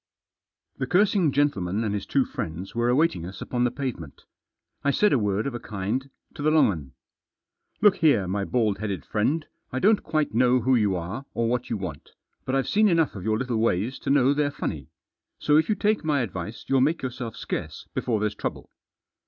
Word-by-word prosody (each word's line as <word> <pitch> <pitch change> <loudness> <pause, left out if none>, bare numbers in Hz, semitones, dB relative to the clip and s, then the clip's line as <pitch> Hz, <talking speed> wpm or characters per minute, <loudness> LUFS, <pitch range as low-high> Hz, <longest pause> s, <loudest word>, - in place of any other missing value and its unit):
The 130 - -1
cursing 190 -1 +3
gentleman 110 -8 0
and 105 -2 -1
his 100 -2 -3
two 135 -2 +2
friends 85 +4 -6
were 120 +1 +1
awaiting 145 - +2
us 95 +2 -8
upon 125 -1 -1
the - - +3
pavement. 120 - -6 0.6
I 140 - +2
said 210 +9 +3
a 135 - +4
word 105 0 0
of 140 - -2
a 120 - -4
kind 110 +5 -3 0.2
to - - -8
the 150 - +3
long 155 -8 +5
'un. 70 -7 -7 0.4
" - - -48
Look 205 -2 +6
here, 140 - +3
my 100 +2 -1
bald 110 -2 0
headed 100 -6 -3
friend, 145 +9 0 0.3
I 130 - -3
don't 205 +8 +4
quite 155 -5 -1
know 125 +2 +4
who 130 +3 +2
you 105 -5 +2
are, 95 +11 -5
or 115 0 +1
what 125 +1 -1
you 115 - -1
want, 90 -7 -7 0.3
but 130 - -1
I've 135 - +1
seen 215 +1 +4
enough 165 -5 +2
of 95 - -6
your 110 0 +1
little 125 -1 -2
ways 110 +3 0
to - - -4
know 140 -1 +4
they're 145 0 +1
funny; 75 - -5 0.5
so 150 - +2
if 160 - +2
you 215 - +3
take 210 -1 +1
my 150 -4 +1
advice 105 0 -5
you'll 135 -1 +3
make 155 +4 +1
yourself 125 -3 -4
scarce - - -5
before 115 -3 0
there's 105 0 0
trouble." - - -5
125 Hz, 210 wpm, -25 LUFS, 100-145 Hz, 0.6 s, Look